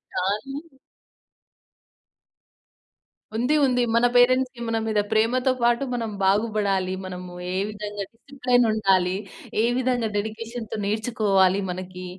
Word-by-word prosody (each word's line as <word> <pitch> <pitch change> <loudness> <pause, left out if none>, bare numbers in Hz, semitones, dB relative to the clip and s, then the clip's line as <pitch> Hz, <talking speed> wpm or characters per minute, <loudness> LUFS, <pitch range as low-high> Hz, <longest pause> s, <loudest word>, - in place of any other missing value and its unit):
కానీ 210 +9 -2 2.8
ఉంది. 250 +7 +2
ఉంది. 250 -2 +2
మన 235 +1 +4
పేరెంట్స్‌కి 255 0 +3
మన 225 - 0
మీద 215 -1 +1
ప్రేమతో 240 +4 +2
పాటు, 240 +2 +3
మనం 230 -2 -2
బాగుబడాలి, 200 -2 +1
మనము 180 -1 -7 0.2
ఏ - - -1
విధంగా 210 -1 -5
డిసిప్లేనుండాలి, 225 -8 +1 0.5
ఏ - - +4
విధంగా 250 -3 +1
డెడికేషన్‌తో 220 +1 -5
నేర్చుకోవాలి 205 -3 +2
మనకి, 185 0 -7
220 Hz, 100 wpm, -24 LUFS, 195-245 Hz, 2.8 s, మన